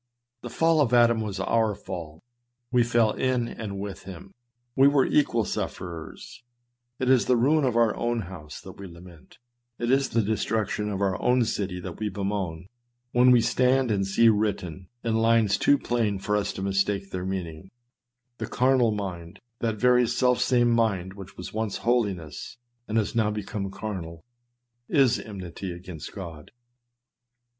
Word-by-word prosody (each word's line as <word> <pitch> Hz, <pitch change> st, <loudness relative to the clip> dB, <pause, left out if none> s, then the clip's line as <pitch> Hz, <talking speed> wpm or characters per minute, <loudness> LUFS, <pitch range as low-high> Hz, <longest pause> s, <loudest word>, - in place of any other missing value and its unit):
The 120 Hz, -, -7 dB
fall 160 Hz, +5 st, +3 dB
of 125 Hz, -3 st, +2 dB
Adam 120 Hz, -1 st, +4 dB
was 100 Hz, -3 st, -4 dB
our 110 Hz, +1 st, +1 dB
fall; 85 Hz, -4 st, -8 dB, 0.5 s
we 125 Hz, -1 st, +4 dB
fell 115 Hz, -2 st, +2 dB
in 125 Hz, -1 st, 0 dB
and 100 Hz, -4 st, -6 dB
with 100 Hz, -1 st, -7 dB
him; 95 Hz, +1 st, -10 dB, 0.4 s
we 135 Hz, +1 st, +6 dB
were 140 Hz, -2 st, +4 dB
equal 120 Hz, -7 st, +2 dB
suf -, -, -3 dB
ferers; 85 Hz, -3 st, -9 dB, 0.6 s
it 130 Hz, -, -2 dB
is 130 Hz, -2 st, +4 dB
the 125 Hz, -, +4 dB
ruin 145 Hz, +6 st, +3 dB
of 125 Hz, -3 st, 0 dB
our 115 Hz, -3 st, +3 dB
own 120 Hz, -1 st, -1 dB
house 85 Hz, -5 st, -9 dB
that -, -, -12 dB
we 100 Hz, -, -7 dB
lament, 85 Hz, -1 st, -15 dB, 0.4 s
it 120 Hz, +1 st, -1 dB
is 135 Hz, 0 st, +2 dB
the 115 Hz, -, +1 dB
destruction 105 Hz, 0 st, -1 dB
of 100 Hz, -1 st, -3 dB
our 95 Hz, -2 st, 0 dB
own 125 Hz, -1 st, +3 dB
city 95 Hz, -4 st, -3 dB
that 90 Hz, -2 st, -8 dB
we 105 Hz, -1 st, -1 dB
bemoan, 95 Hz, -4 st, -3 dB, 0.4 s
when 125 Hz, +1 st, +5 dB
we 125 Hz, -2 st, +6 dB
stand 130 Hz, 0 st, +2 dB
and 100 Hz, -2 st, 0 dB
see 115 Hz, +4 st, +4 dB
written, 100 Hz, -5 st, 0 dB, 0.2 s
in 115 Hz, -1 st, 0 dB
lines 115 Hz, -3 st, +3 dB
too 145 Hz, -, +4 dB
plain 115 Hz, -6 st, -1 dB
for 105 Hz, +2 st, -1 dB
us 105 Hz, -1 st, 0 dB
to 95 Hz, -, -5 dB
mistake 100 Hz, 0 st, 0 dB
their 90 Hz, -1 st, -4 dB
meaning, 95 Hz, -2 st, -5 dB, 0.3 s
" 120 Hz, 0 st, -54 dB
The -, -, -3 dB
carnal 125 Hz, -3 st, +2 dB
mind 90 Hz, -3 st, -6 dB
" -, -, -51 dB
— 120 Hz, -, -51 dB
that 115 Hz, -2 st, -1 dB
very 125 Hz, +2 st, +4 dB
selfsame 125 Hz, 0 st, +2 dB
mind 100 Hz, -6 st, 0 dB
which 100 Hz, -1 st, -11 dB
was 90 Hz, -, -8 dB
once 110 Hz, -2 st, -2 dB
holiness, 105 Hz, -, -2 dB, 0.3 s
and 110 Hz, -, -1 dB
has 105 Hz, -2 st, 0 dB
now 110 Hz, -2 st, +2 dB
become 105 Hz, -1 st, -4 dB
carnal 90 Hz, -5 st, -6 dB, 0.2 s
— 120 Hz, 0 st, -52 dB
" 120 Hz, 0 st, -50 dB, 0.2 s
is 125 Hz, -, +2 dB
enmity 95 Hz, -2 st, -7 dB
against 85 Hz, -3 st, -8 dB
God." 85 Hz, -6 st, -9 dB
105 Hz, 175 wpm, -26 LUFS, 95-120 Hz, 0.6 s, we